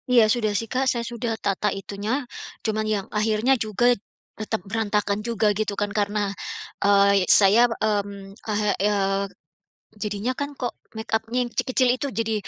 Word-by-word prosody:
Iya 245 -2 +6
sudah 220 -4 0
sih 225 - -2
Kak, 260 +1 +1
saya 235 -1 -1
sudah 230 -1 -3
tata 200 +1 0
itunya. 205 +7 -3 0.4
Cuman 215 -1 0
yang 205 -3 0
akhirnya 215 +4 +2
juga 215 +3 0 0.5
tetap 215 -2 -3
berantakan 210 -1 0
juga 215 -2 +1
gitu 205 0 -2
kan 205 0 -1
karena, 205 -1 0 0.5
eee, 200 0 +5
y - - +2
saya, 205 +3 +6
mmm, 205 -3 -2
heeh, 210 -1 +1
eee, 200 -1 +1 0.8
jadinya 210 +3 -1
kan 285 0 -3
kok 250 -4 -4 0.2
makeup-nya 225 +1 -2
yang - - -19
kecil-kecil 255 +1 +1
itu 280 - -3
jadi, 225 -1 -1
215 Hz, 155 wpm, -24 LUFS, 200-230 Hz, 0.8 s, Iya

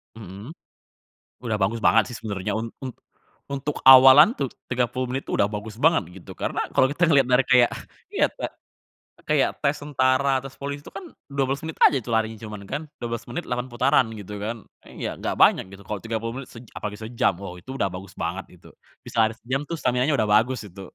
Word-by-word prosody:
Mhm. 105 - -10 0.9
Udah 115 -3 -1
bagus 105 +4 0
banget 115 - +5
sih, 120 - -6
sebenernya 100 -2 -4
un 115 +2 -3
un 130 - -4 0.6
untuk 140 +1 -4
awalan 130 - +9
tuh 140 - 0 0.2
30 125 0 -1
menit 135 +1 -3
tuh, - - -3
udah 100 - +3
bagus 105 0 -6
banget 160 -7 +5 0.2
gitu, - - -13
karena - - -2
kalo 130 - +4
kita 165 - -5
ngeliat 140 -3 +5
dari 125 +1 +4
kayak, 125 -2 +6 0.4
ya - - +4
ta - - -5 0.8
kayak - - +3
tes 140 +1 +1
tentara 135 -1 +1
terus 135 0 -11
polisi 140 +1 -5
tuh - - -11
kan 375 - -8 0.3
12 140 0 -1
menit 160 0 -6
aja - - +5
tuh 120 - -6
larinya 110 0 0
cuman 105 -1 -8
kan, 145 - -3 0.2
12 115 -1 -4
menit 175 +8 -4
8 125 +1 -2
putaran 120 0 +3
gitu 105 0 -9
kan, 115 +2 -3 0.3
iya, - - -6
enggak - - -3
banyak - - +5
gitu. 95 - -12
Kalo 105 - -3
30 115 0 -3
menit - - -12
sej 115 0 -11
apalagi 105 -1 -5
sejam, 110 -2 0
wah 95 -3 -6
itu 115 - -10
udah 100 - 0
bagus 90 0 -9
banget 90 +4 -3 0.2
itu, - - -16 0.4
bisa - - -9
lari 110 - -2
sejam 130 +3 -2
tuh 170 - -2
staminanya 125 +3 +1
udah 110 -2 +1
bagus 120 +4 +3
itu. 95 +2 -12
120 Hz, 200 wpm, -24 LUFS, 110-135 Hz, 0.9 s, awalan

